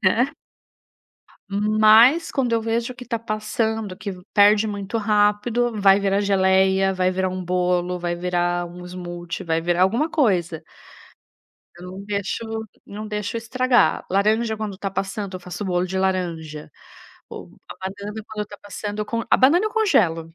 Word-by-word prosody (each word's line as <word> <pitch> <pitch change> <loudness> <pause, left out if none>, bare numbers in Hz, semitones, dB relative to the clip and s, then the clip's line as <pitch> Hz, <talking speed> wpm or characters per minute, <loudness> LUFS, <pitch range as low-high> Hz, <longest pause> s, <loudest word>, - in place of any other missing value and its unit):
né. 240 +9 +3 1.2
Mas, 215 +8 +5
quando 260 -4 -1
eu 225 - +1
vejo 230 +2 -2
que 250 - -10
está 235 -1 -3
passando, 215 -2 -3
que 200 - -5 0.2
perde 205 +1 +5
muito 205 +2 -3
rápido, 210 +3 +1
vai 195 0 +6
virar 195 0 +1
geleia, 190 -1 +3
vai 185 0 +1
virar 185 0 -1
um 185 0 -5
bolo, 180 0 0
vai 175 0 -2
virar 175 0 -1
um 180 +1 -11
smoothie, 175 -1 -7
vai 165 -1 0
virar 175 +1 0
alguma 230 +11 +2
coisa. 175 - +1 1.1
Eu 175 - -12
não 195 +1 -8
deixo 200 +2 -3 0.4
não 210 +2 -7
deixo 210 +2 -3
estragar. 245 -5 +1
Laranja, 220 +3 +1
quando 210 -3 -5
tá 195 0 -3
passando, 195 0 -4
eu - - -6
faço 180 +3 -7
bolo 180 -2 0
de 190 +1 -4
laranja, 170 -5 -2 0.6
ou - - -9 0.2
a - - -9
banana, 205 +3 -6
quando 215 -1 -4
está 205 0 -12
passando, 205 +1 -6
eu 210 - -3
con 230 0 -2
a - - +5
banana 325 +10 +4
eu - - -3
congelo. 170 - +1
200 Hz, 160 wpm, -22 LUFS, 180-220 Hz, 1.2 s, vai